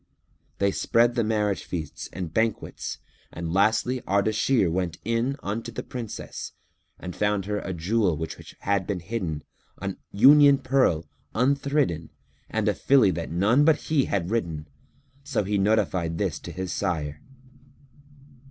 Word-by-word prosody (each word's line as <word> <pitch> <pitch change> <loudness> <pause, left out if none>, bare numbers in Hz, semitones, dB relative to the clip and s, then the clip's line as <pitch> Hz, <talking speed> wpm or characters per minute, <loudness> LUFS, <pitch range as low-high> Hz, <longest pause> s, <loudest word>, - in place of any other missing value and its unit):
They 100 0 +2
spread 120 +4 +2
the 120 -1 +1
marriage 105 -2 0
feasts 80 -5 -5
and 90 -3 -5
banquets 110 -1 -1 0.3
and 85 0 -4
lastly 110 +6 +2
Ardashir 105 +3 +2
went 90 -1 -2
in 115 +4 0
unto 115 +4 -3
the 110 - -5
Princess 120 -4 -6 0.4
and 90 -1 -7
found 105 -2 0
her 105 0 -1
a 95 - -5
jewel 90 0 +1
which 80 +1 -4 0.3
had 100 -2 0
been 95 -4 -2
hidden, 85 -6 -3 0.4
an - - -4
union 140 +6 +7
pearl 130 - +2 0.3
unthridden 135 - +1 0.4
and - - -1
a - - +3
filly 130 -8 +4
that 85 -2 -4
none 105 - +3
but 160 0 +6
he 150 -4 +1
had 95 -1 -1
ridden, 85 -9 -2 0.6
so 105 - -1
he 100 +1 0
notified 95 -5 +1
this - - -1
to - - -8
his 95 -1 -4
sire. 75 -6 -2
100 Hz, 145 wpm, -26 LUFS, 90-115 Hz, 0.6 s, union